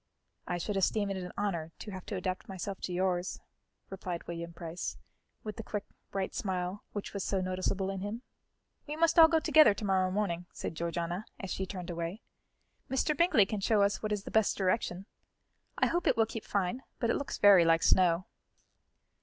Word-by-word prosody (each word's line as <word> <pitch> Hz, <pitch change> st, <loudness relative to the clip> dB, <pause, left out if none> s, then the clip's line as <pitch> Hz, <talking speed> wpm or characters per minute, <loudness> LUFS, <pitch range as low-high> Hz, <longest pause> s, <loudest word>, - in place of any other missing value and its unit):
"I 175 Hz, -, -1 dB
should 195 Hz, +3 st, -2 dB
esteem 200 Hz, +1 st, +1 dB
it 195 Hz, -, -2 dB
an 180 Hz, -1 st, -5 dB
honour 170 Hz, -6 st, -2 dB
to 210 Hz, -, -8 dB
have 185 Hz, -2 st, -8 dB
to 205 Hz, -, -3 dB
adapt 185 Hz, +1 st, -3 dB
myself 195 Hz, +1 st, -5 dB
to -, -, -3 dB
yours," 180 Hz, 0 st, 0 dB, 0.5 s
replied 180 Hz, -3 st, -5 dB
William 170 Hz, 0 st, -5 dB
Price, 170 Hz, 0 st, -5 dB, 0.5 s
with 215 Hz, -1 st, -6 dB
the 225 Hz, -, -5 dB
quick, 210 Hz, -1 st, -3 dB, 0.3 s
bright 195 Hz, -1 st, -2 dB
smile 185 Hz, 0 st, -2 dB
which 205 Hz, -, -5 dB
was 200 Hz, -, -2 dB
so 195 Hz, -, 0 dB
noticeable 185 Hz, +1 st, -1 dB
in 195 Hz, -, -4 dB
him. 205 Hz, +5 st, -5 dB, 0.6 s
"We 295 Hz, -, -3 dB
must 330 Hz, +1 st, +4 dB
all 325 Hz, -, +11 dB
go 325 Hz, 0 st, +3 dB
together 305 Hz, -8 st, +6 dB
to 210 Hz, -, -5 dB
morrow 190 Hz, -1 st, +2 dB
morning," 185 Hz, -3 st, -1 dB
said -, -, -4 dB
Georgiana, 170 Hz, +3 st, -3 dB
as 195 Hz, -, -5 dB
she 190 Hz, -, -3 dB
turned 180 Hz, -2 st, -5 dB
away. 170 Hz, +5 st, -4 dB, 0.7 s
"Mr. 270 Hz, +3 st, +1 dB
Bingley 315 Hz, -, +5 dB
can 210 Hz, +1 st, -3 dB
show 205 Hz, +1 st, +3 dB
us 200 Hz, 0 st, +1 dB
what 215 Hz, -, -2 dB
is 205 Hz, -2 st, -1 dB
the -, -, -8 dB
best 220 Hz, -2 st, +3 dB
direction. 185 Hz, -1 st, 0 dB, 0.7 s
I -, -, +4 dB
hope 345 Hz, +1 st, 0 dB
it 245 Hz, -, +3 dB
will 225 Hz, -, +5 dB
keep 225 Hz, 0 st, -7 dB
fine, 200 Hz, +5 st, -1 dB, 0.2 s
but 235 Hz, -1 st, +1 dB
it -, -, +1 dB
looks 280 Hz, -, -3 dB
very 200 Hz, -4 st, +8 dB
like 165 Hz, 0 st, +4 dB
snow." 180 Hz, -1 st, +4 dB
195 Hz, 195 wpm, -31 LUFS, 180-210 Hz, 0.7 s, all